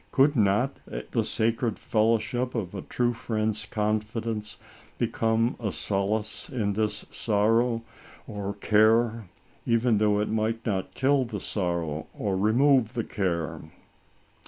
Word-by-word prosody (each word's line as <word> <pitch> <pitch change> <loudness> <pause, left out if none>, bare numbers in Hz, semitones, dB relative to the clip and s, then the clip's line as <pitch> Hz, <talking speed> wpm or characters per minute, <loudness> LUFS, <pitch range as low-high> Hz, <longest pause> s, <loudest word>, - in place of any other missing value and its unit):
Could 145 +2 +4
not 110 +5 +2 0.3
the - - +1
sacred 115 0 0
fellowship 115 +3 0
of 100 -6 -3
a 95 - -4
true 120 -1 0
friend's 110 -2 -2
confidence 110 0 -2 0.4
become 115 0 +1
a 110 -4 -2
solace 100 +5 -2
in 105 -6 -1
this 105 0 -2
sorrow 115 +2 +1 0.4
or 100 -1 -5
care, 110 +1 +3 0.3
even 115 -2 +2
though 105 -1 +3
it 105 - 0
might 110 +1 -1
not 95 -4 -2
kill 135 0 +3
the 110 -3 -5
sorrow 85 -6 -2
or 100 -2 -1
remove 120 +4 +3
the 115 - 0
care 85 -8 -2
110 Hz, 125 wpm, -27 LUFS, 105-115 Hz, 0.4 s, Could